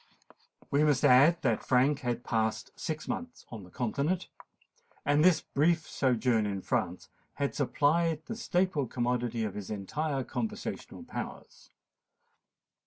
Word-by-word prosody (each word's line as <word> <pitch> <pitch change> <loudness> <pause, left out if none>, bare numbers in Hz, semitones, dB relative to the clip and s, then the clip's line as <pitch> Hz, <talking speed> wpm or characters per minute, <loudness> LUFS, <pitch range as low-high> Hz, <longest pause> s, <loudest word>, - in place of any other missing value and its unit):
We 145 +2 +3
must 145 -3 +3
add, 150 +7 +6
that 120 -5 +1
Frank 135 +3 +3
had 120 -2 -2
passed 110 -2 -1
six 155 -1 -4
months 250 0 -5
on 110 -4 -8
the 90 - -13
continent; 140 - -1 0.8
and 145 +2 +3
this 180 -2 +5
brief 160 +3 +1
sojourn 120 -4 +1
in 100 -2 -3
France - - -1 0.3
had 140 -1 -1
supplied 155 +3 +1
the 225 - -5
staple 180 - 0
commodity 120 -1 -1
of 105 -3 -3
his 100 -2 -7
entire 135 +8 -2
conversational 120 -3 -5
powers. - - -8
135 Hz, 130 wpm, -30 LUFS, 120-155 Hz, 0.8 s, add